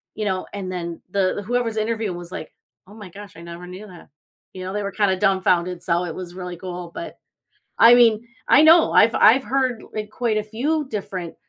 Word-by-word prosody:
you 215 - -3
know, 190 -2 -2
and 190 -2 -5
then 170 -2 -5
the 200 +1 0
whoever's 240 -2 -1
interviewing 215 -4 -2
was 175 0 -10
like, 155 - -8 0.3
"Oh 205 - -15
my 210 -4 -11
gosh, 200 0 -12
I - - -11
never 170 +1 -9
knew 190 +4 -10
that." 175 -6 -15 0.4
You 185 - -8
know, 185 - -5
they 210 - -2
were 200 - -4
kinda 190 -2 +1
dumbfounded, 185 -3 +1
so, 170 0 0
it 165 -2 -6
was 180 -1 -8
really 180 -1 -6
cool. 180 -1 -7
But 335 - -8 0.6
I 230 +1 +8
mean, 235 -1 +4 0.2
I 290 - +6
know, 325 +2 +6
I've 225 +2 +5
I've 245 +5 +5
heard 255 -3 -1 0.3
quite 225 -2 -1
a 215 - -1
few 275 +8 -2
different 190 -6 -5
200 Hz, 205 wpm, -22 LUFS, 180-225 Hz, 0.6 s, I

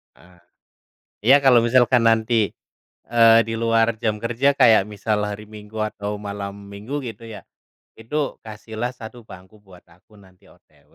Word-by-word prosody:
Eee, 90 0 -22 0.9
ya - - +9
kalau 125 -3 +6
misalkan 120 +1 +3
nanti, 110 -1 +2 0.6
eee, 115 -1 +5
di 115 - -4
luar 115 0 +1
jam 105 -2 -1
kerja 120 +5 +1
kayak 115 -7 +4
misal 105 +1 -3
hari 105 +1 -6
Minggu 105 0 -10
atau 105 -1 -4
malam 100 -1 -6
Minggu 105 +9 -6
gitu 115 0 -9
ya, 110 -2 -9 0.6
itu 140 +6 -4
kasihlah 110 +3 -6
satu 115 -1 -12
bangku 95 +2 -15
buat 95 -4 -18
aku 90 +5 -24
nanti 95 -2 -22
OTW. - - -26
110 Hz, 150 wpm, -21 LUFS, 105-115 Hz, 0.9 s, ya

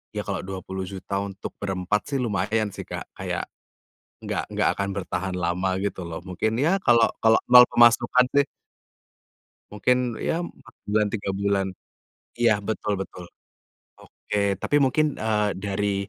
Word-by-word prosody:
Ya 105 - -2
kalau 100 -2 -3
Rp20.000.000 95 +1 -5
untuk 100 -1 -6
berempat 95 +1 -1
sih 140 - -3
lumayan 105 -1 0
sih, - - -8
Kak, - - -6
kayak, - - -3 0.8
nggak - - -2
nggak - - +2
akan 100 0 -1
bertahan 95 -1 -3
lama 90 +2 0
gitu 100 -2 -3
loh, 85 +1 -6
mungkin 95 +4 -1
ya, 170 +6 +3
kalau 115 -1 +5
kalau 110 0 +5
nol 125 0 +10
pemasukan 120 +1 +5
sih 140 -1 +4 1.3
mungkin 125 +3 +1
ya 165 - -1
4 170 -9 -9
bulan 105 0 +2
3 100 -3 -3
bulan 100 -1 0 0.7
iya 120 -2 +4
betul 105 0 -2
betul. 90 -2 -10 0.7
Oke, 100 -1 -2
tapi 145 - +1
mungkin, 150 +3 +1
eee, 105 -1 +1
dari 100 0 -1
105 Hz, 140 wpm, -25 LUFS, 95-115 Hz, 1.3 s, nol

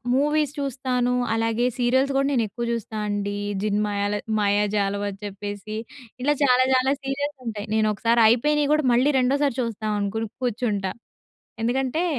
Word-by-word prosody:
Movies 295 +1 +1
చూస్తాను. 255 -2 -1 0.2
అలాగే 225 +1 +1
serials 260 +3 +2
కూడా 275 0 +2
నేను 250 -4 +2
ఎక్కువ 235 +4 -5
జూస్తానండి. 205 -3 -3 0.3
జిన్ 210 -1 +1
మాయల 205 0 -1 0.3
మాయజాలం 205 0 +1
అని 195 -1 -9
చెప్పేసి, 205 +1 -6 0.5
ఇలా 295 +2 +3
చాలా 255 -2 +5
చాలా 260 +1 +3
సీరియల్స్ 280 +2 -3
ఉంటాయి 210 -2 -4
నేనొకసారి 220 +2 +2
అయిపోయినయి 290 +6 +3
గూడా 305 -2 +2
మళ్ళీ 255 +5 +4
రెండోసారి 275 +1 +1
చూస్తాం 220 -2 -3
అనుకుని 215 +3 -2 0.2
కూర్చుంటా. 215 -5 -1 0.7
ఎందుకంటే 265 +7 0
235 Hz, 135 wpm, -24 LUFS, 205-270 Hz, 0.7 s, చాలా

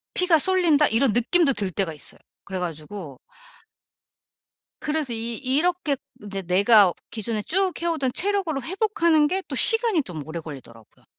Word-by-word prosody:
'피가 360 -3 +3
쏠린다.' 330 -4 +3
이런 230 +2 +2
느낌도 275 - +2
들 200 -5 -3
때가 180 0 -2
있어요. 150 - -12 0.3
그래 190 -1 -5
가지고 160 -3 -7 1.6
그래서 300 -5 -2
이 230 +1 -3
이렇게 295 +4 0 0.3
이제 195 -1 -5
내가 195 +1 +4 0.2
기존에 220 -1 -3
쭉 380 - 0
해오던 320 -7 -1
체력으로 380 -7 -1
회복하는 340 - +1
게 375 +5 -2
또 - - -6
시간이 450 - +5
좀 160 - -8
오래 165 +2 -6
걸리더라고요. 130 -8 -13
260 Hz, 325 characters per minute, -23 LUFS, -, 1.6 s, 시간이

